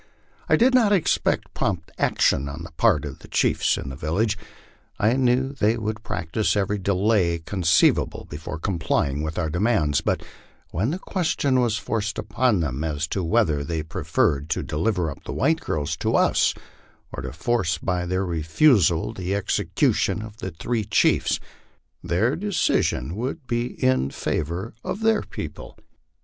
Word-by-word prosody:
I - - +6
did 255 +3 +4
not 235 -5 +4
expect 190 -6 +1
prompt 90 -6 -2
action 70 +1 +2
on 75 +4 -7
the 85 - -9
part 85 -4 +2
of 70 -2 -7
the - - -13
chiefs - - +2
in 70 - -5
the 65 - -6
village. 95 - 0 0.6
I 110 +2 +3
knew 130 +1 +2
they 115 -4 +1
would 110 -1 -3
practise 105 0 -1
every 100 +1 0
delay 95 -2 +2
conceivable 85 -2 +2
before 80 +2 -6
complying 75 -5 -1
with 80 +1 -4
our 80 -4 -1
de 90 - -2
mands; 85 -10 +2
but - - -1 0.5
when 100 +9 0
the 165 - -1
question 155 -9 0
was 115 -3 +1
forced 105 -2 -2
upon 105 -1 +1
them 70 -1 -2
as 75 -1 -1
to 95 - -2
whether 80 -6 +2
they 80 +1 -3
pre 80 - -6
ferred 70 +1 +1
to - - -1
deliver 90 0 -1
up - - -11
the 65 - -5
white 160 - +2
girls 75 - -2
to - - 0
us - - +3 0.6
or - - -5
to 65 0 -5
force 85 - 0
by 90 +1 -2
their 95 +2 0
refusal 85 - +3
the 95 -1 -2
exe 100 - 0 0.2
cution 110 - +2
of 110 -1 -12
the 95 - -5
three 110 +7 -2
chiefs, 105 - +2 0.6
their 110 - +1
decision 160 - 0
would 130 +6 -4
be 120 -1 -1 0.2
in 65 +1 +2
favor 85 +10 -3
of 210 - -4
their 220 -1 +3
people. - - -8
95 Hz, 165 wpm, -24 LUFS, 80-115 Hz, 0.6 s, I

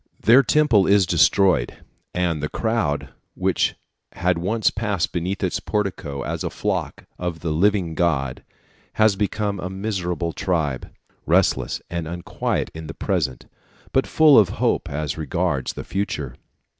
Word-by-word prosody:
Their 120 +5 +6
Temple 130 -7 +3
is 100 -1 +5
destroyed, 90 -5 +3 0.3
and 85 -4 -1
the 75 - -2
crowd 110 -11 -1 0.3
which - - +1 0.4
had 90 -1 0
once 105 +5 +1
pressed 105 -5 -1
beneath 90 +3 -3
its 90 - 0
portico 95 -9 -3
as - - -4
the - - -2
flock - - -3
of 85 -3 -4
the 85 - -2
living 90 +1 +2
God 75 -7 0 0.5
has 110 -2 +4
become 105 0 -1
a 90 - -4
miserable 95 -4 -3
tribe, 80 -8 -2 0.4
restless - - +2
and 85 -2 -4
unquiet 85 +1 -3
in 80 0 -8
the 80 - -7
present, 80 -10 -2 0.5
but 135 - +2
full 155 -5 +6
of 100 - +4
hope - - 0
as 75 +1 -3
regards 85 -4 -1
the - - -6
future. 75 -10 -3
90 Hz, 145 wpm, -22 LUFS, 80-100 Hz, 0.5 s, Their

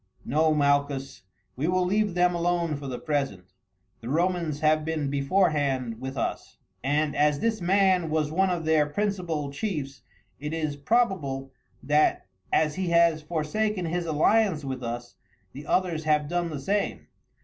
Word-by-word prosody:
"No, 155 +3 +2
Malchus, 140 -2 0 0.3
we 140 +5 -1
will 180 0 +2
leave 205 0 +1
them 180 0 +3
alone 170 -2 0
for 140 0 -7
the 125 -2 -4
present. 135 - -3 0.5
The 115 - -8
Romans 170 -1 0
have 155 0 +3
been 155 -3 -2
beforehand 140 - +1
with 130 +1 -5
us, - - -3 0.3
and 145 +2 +1
as 145 0 +2
this 225 -3 0
man 185 -2 +3
was 155 -1 0
one 190 +4 +2
of 175 -3 -2
their 155 -2 +3
principal 170 -5 -2
chiefs, 140 -6 -4 0.4
it 150 +3 -4
is 155 -3 -2
probable 145 - 0 0.3
that, 150 +2 +2 0.3
as 155 -1 +2
he 185 +1 -3
has 170 -2 +4
forsaken 175 +6 -1
his 170 +1 -2
alliance 160 +1 +2
with 130 -1 -4
us, 120 0 -6 0.4
the 145 +3 -9
others 170 -4 0
have 150 -1 +2
done 175 +1 -1
the 150 -3 -5
same. 200 +8 -1
155 Hz, 155 wpm, -26 LUFS, 140-175 Hz, 0.5 s, has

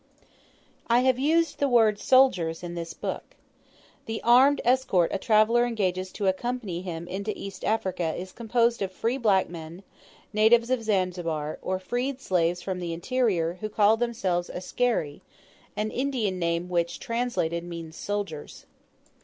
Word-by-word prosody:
I 240 +1 +4
have 255 -1 +2
used 320 +3 +1
the 280 - +2
word 220 -4 +4
"soldiers" 185 -13 +3
in 175 -1 -5
this 170 -1 -5
book. - - -6 0.7
The 225 0 -3
armed 260 +4 +6
escort 240 -9 +2
a 195 - -1
traveller 220 +3 +4
engages 190 -6 -1
to 205 - -3
accompany 195 -2 -2
him 170 -2 -6
into 200 +4 -3
East 195 -1 -8
Africa 185 -6 -1
is 185 +1 -6
composed 235 +1 +1
of 190 -1 -2
free 230 +7 -2
black 200 -6 +3
men, 170 +2 -9 0.5
natives 230 +3 +4
of 255 -2 +1
Zanzibar, 175 -7 -1
or 185 - -1
freed 245 +8 -3
slaves 175 -6 0
from 185 -2 -3
the 170 -2 -3
interior, 180 -4 0
who 215 - -3
call 215 +1 +4
themselves 205 -7 -1
"askari," 185 -6 -2 0.5
an 215 +1 -2
Indian 245 -8 -1
name 170 0 -1
which, 170 -1 -1
translated, 230 -9 -2
means 170 -2 -8
"soldiers." 200 -8 -5
200 Hz, 145 wpm, -26 LUFS, 175-240 Hz, 0.7 s, armed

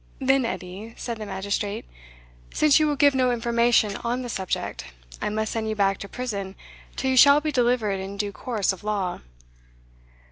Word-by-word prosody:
"Then, 265 -1 +2
Edie," 205 +2 -6
said 235 -2 -5
the 215 - -6
magistrate, 200 +1 -3 0.7
"since 305 -1 +4
you 310 - +3
will 295 - +1
give 285 0 +5
no 255 -1 +2
information 235 -3 +2
on 245 +2 -2
the 245 - -6
subject, 190 -5 -3 0.4
I - - -1
must 220 +1 -2
send 220 -1 -2
you 215 - -2
back 195 -2 +1
to 200 - -8
prison 200 -6 -4 0.4
till 265 - 0
you 260 - +1
shall 280 +3 +8
be 305 0 -2
delivered 240 -6 +1
in 195 +1 -6
due 205 0 -2
course 215 -3 -1
of 190 - -12
law." 200 -4 -2
225 Hz, 180 wpm, -25 LUFS, 200-255 Hz, 0.7 s, shall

